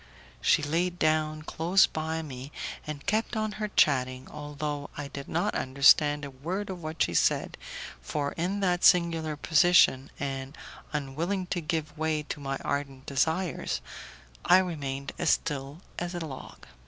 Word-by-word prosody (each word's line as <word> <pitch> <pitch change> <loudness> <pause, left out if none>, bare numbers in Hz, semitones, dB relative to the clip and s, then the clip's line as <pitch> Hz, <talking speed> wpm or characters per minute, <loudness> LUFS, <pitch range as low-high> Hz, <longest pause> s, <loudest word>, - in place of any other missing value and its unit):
She 155 - +4
laid 170 +4 0
down 155 -1 +1
close 175 +5 +3
by 160 +1 -3
me, 135 -1 -8 0.4
and 150 -2 -6
kept 220 +4 0
on 215 0 0
her 210 - 0
chatting, 130 -8 +2
although 145 -1 -4
I 145 -1 -5
did 140 0 -7
not 180 +6 0
understand 145 +2 +4
a 140 - -7
word 180 +10 -4
of 180 -2 -7
what 155 0 -1
she 85 - -1
said, - - +2 0.5
for 140 - -2
in 185 +5 -2
that 180 -2 +1
singular 165 -3 +4
position, 155 -4 +4
and 135 0 -4 0.3
unwilling 155 +7 -2
to 175 - -2
give 155 -2 -2
way 155 -1 0
to 150 - -6
my 135 -1 -3
ardent 140 -2 -3
desires, 160 +6 0 0.6
I 180 - +7
remained 140 -7 -2
as - - +2
still 140 +1 -1 0.2
as 175 +1 -4
a 170 -2 -3
log. 135 -4 -9
155 Hz, 155 wpm, -28 LUFS, 140-175 Hz, 0.6 s, I